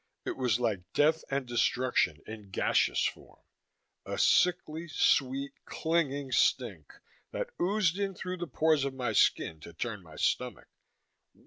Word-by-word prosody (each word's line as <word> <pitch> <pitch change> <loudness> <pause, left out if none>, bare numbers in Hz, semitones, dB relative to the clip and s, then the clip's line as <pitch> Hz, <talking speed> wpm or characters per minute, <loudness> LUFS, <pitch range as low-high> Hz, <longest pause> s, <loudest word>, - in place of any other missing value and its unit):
It - - -3
was 125 -3 +1
like 110 -6 0
death 155 +2 +3
and 140 -1 -1
destruction 120 -8 +1
in 110 -2 -9
gaseous - - +2
form; - - -5 0.7
a - - -5
sickly 170 -2 +2
sweet, 135 -2 +1
clinging 145 -5 -1
stink 125 - +1 0.4
that - - -4
oozed 190 -1 +1
in 195 -1 -1
through 185 +1 -5
the 175 0 -4
pores 155 -2 +2
of 135 -1 -3
my 125 -4 -2
skin 80 -5 +2
to 85 - -11
turn 105 +3 -4
my 80 -3 -15
stomach. - - -1
135 Hz, 140 wpm, -30 LUFS, 115-165 Hz, 0.7 s, death